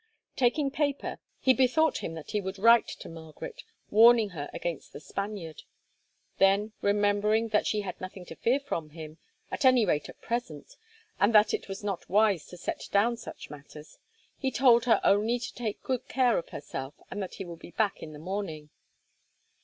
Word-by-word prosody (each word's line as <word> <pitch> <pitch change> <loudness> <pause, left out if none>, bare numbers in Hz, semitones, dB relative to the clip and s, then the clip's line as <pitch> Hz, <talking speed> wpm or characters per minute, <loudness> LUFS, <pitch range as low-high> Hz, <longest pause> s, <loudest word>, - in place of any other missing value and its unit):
Taking 270 +3 +2
paper, 285 -1 -2 0.2
he 260 - +4
bethought 265 +5 +2
him 165 - -5
that 155 -3 -8
he 210 - 0
would 190 +1 -5
write 230 +3 +6
to - - -8
Margaret, 160 -2 -9 0.3
warning 225 0 +7
her 150 -6 -6
against 170 -4 -5
the - - -8
Spaniard. 195 -2 -6 0.8
Then, 195 +3 +4
remembering 205 +2 +2
that 210 -1 +2
she 210 - 0
had 185 -3 -7
nothing 185 0 -8
to 165 - -10
fear 245 - +1
from 170 - -4
him, 155 0 -10 0.3
at - - -3
any 255 -4 +6
rate 150 -5 0
at - - -12
present, 230 -12 -5 0.4
and 205 +3 +3
that 210 0 +6
it - - -3
was 195 +2 -6
not 200 -3 -4
wise 200 -4 +3
to 180 - -11
set - - -5
down 220 +4 +3
such 235 - -10
matters, 150 +1 -12 0.4
he 265 - 0
told 240 -2 +4
her 230 - +4
only 215 +4 +3
to 245 - -6
take 225 -4 -4
good 255 -2 -2
care 250 -3 +2
of 170 - -9
herself, 135 -1 -6 0.2
and 205 - -4
that 190 - -6
he 195 - -6
would 170 -1 -9
be - - -11
back 205 +2 -1
in 155 - -8
the 150 - -10
morning. 160 -3 -5
205 Hz, 185 wpm, -28 LUFS, 170-235 Hz, 0.8 s, warning